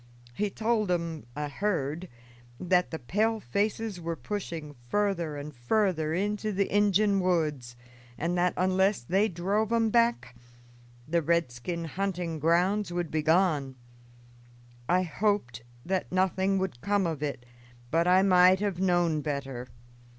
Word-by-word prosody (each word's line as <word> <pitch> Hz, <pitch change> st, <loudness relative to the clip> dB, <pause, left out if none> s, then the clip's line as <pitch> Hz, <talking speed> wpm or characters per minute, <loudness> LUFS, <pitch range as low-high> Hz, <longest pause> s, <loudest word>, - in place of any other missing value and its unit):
He 210 Hz, +11 st, -1 dB
told 220 Hz, -1 st, 0 dB
'em, 165 Hz, -6 st, -2 dB
I 150 Hz, 0 st, -3 dB
heard, 165 Hz, 0 st, -2 dB, 0.5 s
that 180 Hz, 0 st, +2 dB
the 160 Hz, -, -4 dB
pale 215 Hz, -, 0 dB
faces 205 Hz, -, -2 dB
were 165 Hz, 0 st, -3 dB
pushing 165 Hz, -7 st, -5 dB, 0.2 s
further 180 Hz, -6 st, 0 dB
and 145 Hz, 0 st, -7 dB
further 160 Hz, -, 0 dB
into 210 Hz, +3 st, -1 dB
the 200 Hz, 0 st, -1 dB
Injun 205 Hz, 0 st, +3 dB
woods, 155 Hz, -9 st, -1 dB, 0.4 s
and 170 Hz, +3 st, -1 dB
that, 180 Hz, 0 st, +1 dB
unless 190 Hz, +2 st, +2 dB
they 190 Hz, -, +2 dB
drove 200 Hz, +4 st, -1 dB
'em 225 Hz, -1 st, +2 dB
back, 235 Hz, -, +1 dB, 0.7 s
the 170 Hz, +2 st, +1 dB
redskin 165 Hz, 0 st, -1 dB
hunting 175 Hz, -2 st, -3 dB
grounds 180 Hz, +5 st, +2 dB
would 175 Hz, -2 st, -3 dB
be 155 Hz, -, 0 dB
gone. 155 Hz, -5 st, +2 dB, 1.1 s
I 185 Hz, +1 st, +3 dB
hoped 185 Hz, -, -1 dB, 0.2 s
that 190 Hz, +1 st, -2 dB
nothing 190 Hz, +1 st, +1 dB
would 185 Hz, -11 st, -3 dB
come 200 Hz, +2 st, +1 dB
of 160 Hz, -4 st, -3 dB
it, 140 Hz, -5 st, -4 dB, 0.5 s
but 165 Hz, +2 st, +2 dB
I 185 Hz, +1 st, +5 dB
might 185 Hz, -1 st, +6 dB
have 200 Hz, -4 st, -2 dB
known 175 Hz, -4 st, +2 dB
better. 135 Hz, -4 st, -4 dB
180 Hz, 135 wpm, -28 LUFS, 155-200 Hz, 1.1 s, might